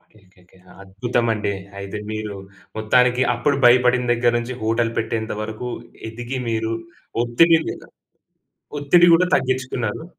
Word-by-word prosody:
Okay. - - -19
Okay. 90 0 -26
Okay. 90 - -24 0.2
అద్భుతమండి. 110 +1 -1 0.3
అయితే 100 +1 -6
మీరు 110 -2 -5 0.4
మొత్తానికి 125 +3 +3
అప్పుడు 140 +4 0
భయపడిన 125 0 +5
దగ్గర 120 0 +2
నుంచి 120 +2 -5
హోటల్ 115 +1 0
పెట్టేంతవరకు 110 +1 -3 0.4
ఎదిగి 120 +3 -5
మీరు 110 0 -1 0.5
ఒత్తిడిమీద 160 +8 +2 1.0
ఒత్తిడి 170 +5 +5
గూడా 180 +2 +3
తగ్గిచ్చుకున్నారు. 130 -1 -2
120 Hz, 110 wpm, -21 LUFS, 110-130 Hz, 1.0 s, భయపడిన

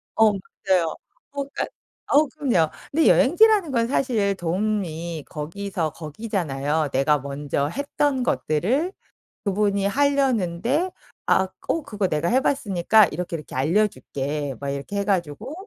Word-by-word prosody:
어 220 -1 +5 0.4
맞아요. 175 -4 +2 0.4
어 280 -1 -2
그러니까 280 - -4 0.5
어우 295 +2 +5
그럼요. 205 - +1 0.2
근데 320 +1 +3
여행지라는 385 - +5
건 230 -2 +1
사실 225 -7 +1
도움이 170 -4 -2
거기서 165 +1 -3
거기잖아요. 155 -4 -2
내가 140 +2 +2
먼저 140 +1 -2
했던 280 - 0
것들을 245 - 0 0.5
그분이 200 0 +1
하려는데 265 - +1 0.4
아 190 0 +3 0.2
어 330 - 0
그거 205 -3 -1
내가 155 +1 0
해봤으니까 220 -6 +3
이렇게, 170 +1 -4
이렇게 150 - -11
알려줄게 145 -4 -1
막 140 0 -4
이렇게 140 +8 -5
해 200 - +1
가지고 195 - -2
195 Hz, 305 characters per minute, -23 LUFS, 155-255 Hz, 0.5 s, 어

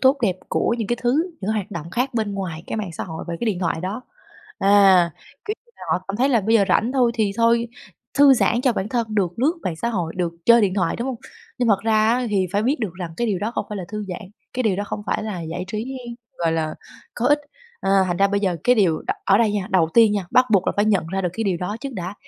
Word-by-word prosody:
tốt 265 +2 +5
đẹp 190 -4 +2
của 235 - +1
những 220 - -2
cái 240 - +1
thứ 300 +9 +1
những 200 - -2
hoạt 210 -1 -3
động 170 -3 -6
khác 250 +6 -1
bên 215 -3 -1
ngoài 170 -5 -4
cái - - -4
mạng 205 -5 -4
xã - - -5
hội 160 -2 -7
và 170 - -2
cái - - -1
điện 195 -5 0
thoại 165 -2 -1
đó. 200 +7 -4 0.6
À, 195 -3 +5 0.3
kiểu, 425 - -2
như 475 - -29
là - - -15
họ 185 - -1
cảm 195 - -2
thấy 260 +4 +2
là 240 -5 +3
bây 220 +3 +1
giờ 210 -3 +5
rảnh 230 +6 +2
thôi 250 -3 +3
thì 215 -4 +1
thôi 235 0 +3 0.5
thư 280 -1 +7
giãn 240 0 +2
cho 255 -2 +2
bản 200 -1 -3
thân 235 -1 -1
được 185 -3 0
lướt 280 +7 +3
mạng 170 - -3
xã 235 - -2
hội 175 -8 -2
được 175 -2 -1
chơi 235 0 +7
điện 195 -2 +1
thoại, 185 -4 0
đúng 240 - -3
hông? 255 - -3 0.4
Nhưng 245 -2 +1
thật 200 -2 +3
ra 220 -1 +3
á, 245 +2 +1
thì 190 -2 +1
phải 205 +1 +1
biết 270 +5 0
được 210 -6 -2
rằng 175 -2 -6
cái 240 - 0
điều 200 -5 0
đó 210 +4 -2
không - - -1
phải 210 - -5
là 185 - -5
thư 210 0 -5
giãn, 180 - -5 0.3
cái 255 - -1
điều 210 -5 +1
đó 205 - -2
không - - -5
phải - - -1
là 210 -5 -4
giải 165 +2 -5
trí, 230 +6 -4 0.4
gọi 165 -1 +1
là, 155 -1 -1 0.4
có 240 - -1
ích, 290 +2 +4 0.4
à, - - -1 0.2
thành 175 - -1
ra 200 +1 +3
bây 200 0 0
giờ 185 -4 0
cái 250 - +5
điều 180 -8 +2
đ - - 0
ở 195 0 +4
đây 225 -3 +3
nha, 200 -3 -2
đầu 175 -4 +3
tiên 225 -3 +6
nha 200 -3 -2
bắt 255 0 +5
buộc 190 -3 +3
là - - +2
phải 205 - +3
nhận 200 -6 +2
ra 190 +3 -2
được 180 - 0
cái 225 +2 -3
điều 185 -3 +1
đó 180 +5 -4
trước 275 -1 -5
đã. 185 -2 -5
205 Hz, 285 wpm, -22 LUFS, 185-235 Hz, 0.6 s, thư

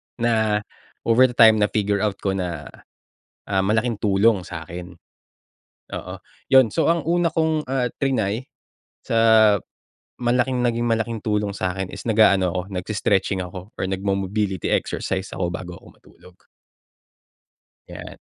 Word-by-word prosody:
na 110 -3 +1 0.4
over 120 +3 +5
the 125 - -9
time 110 -1 +7
na-figure 105 -1 +1
out 105 -1 0
ko 95 - +1
na, 90 -5 -3 0.8
ah, 95 -1 +1
malaking 110 +4 +1
tulong 100 -1 +2
sa'kin, 85 +1 -8 0.9
oo - - -6 0.4
yun. 130 -4 +5
So, 165 - +2
ang 165 -2 +1
una 170 0 +2
kong, 160 -3 -1
ah, 130 -2 0 0.2
trinay 125 -3 -1 0.5
sa 110 -2 +4 0.7
malaking 125 +1 +1
naging 120 0 0
malaking 115 0 -1
tulong 105 -1 -1
sa'kin 95 -1 -3
is - - -9
nag-aano 105 -4 +4
ako, 90 - 0 0.2
nag-i-stretching 95 -1 0
ako 90 +2 -9
or - - -6
nag-mobility 95 0 -2
exercise 95 0 -2
ako 90 -2 -2
bago 90 0 -6
ako - - -18
matulog. 90 0 -20 1.5
'Yan. - - -10
105 Hz, 130 wpm, -22 LUFS, 95-120 Hz, 1.5 s, time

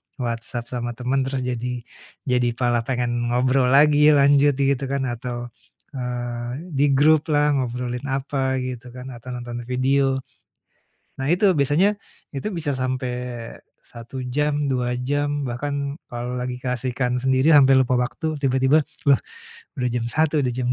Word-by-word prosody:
WhatsApp 120 -1 -4
sama 120 -1 -3
temen, 125 +3 -1
terus 135 -1 -2
jadi 125 0 -3 0.4
jadi 125 -2 +1
malah 120 -2 +1
pengen 125 -2 0 0.2
ngobrol 130 +1 +3
lagi 150 +2 +6
lanjut 140 0 +5
gitu 140 -1 +1
kan 135 -1 -1
atau, 120 0 -4 0.5
eee, 120 -1 -4 0.2
di 140 +1 +3
gruplah 150 +1 +3
ngobrolin 125 -1 -3
apa 135 -1 -1
gitu 125 -1 -6
kan 125 +1 -9
atau 125 +2 -9
nonton 120 -1 -5
video. 135 +2 +1 1.0
Nah 135 +2 -2
itu 190 +1 +4
biasanya 150 +9 +3 0.4
itu 135 - -3
bisa 155 -6 -2
sampai 130 -1 -2 0.7
1 120 +2 -9
jam, 145 +2 0
2 125 -2 0
jam, 145 +1 -1
bahkan 140 +3 -3 0.2
kalau 120 +1 -4
lagi 125 0 -3
keasikan 125 0 -1
sendiri 130 +3 +2
sampai 135 -1 +7
lupa 130 -1 +2
waktu 155 +6 -2
tiba-tiba, 135 +3 +3 0.2
lah, 140 - +5 0.6
udah 125 -1 0
jam 120 -1 -1
1.00, 155 +2 +1
jam 125 0 -1
130 Hz, 140 wpm, -23 LUFS, 125-140 Hz, 1.0 s, sampai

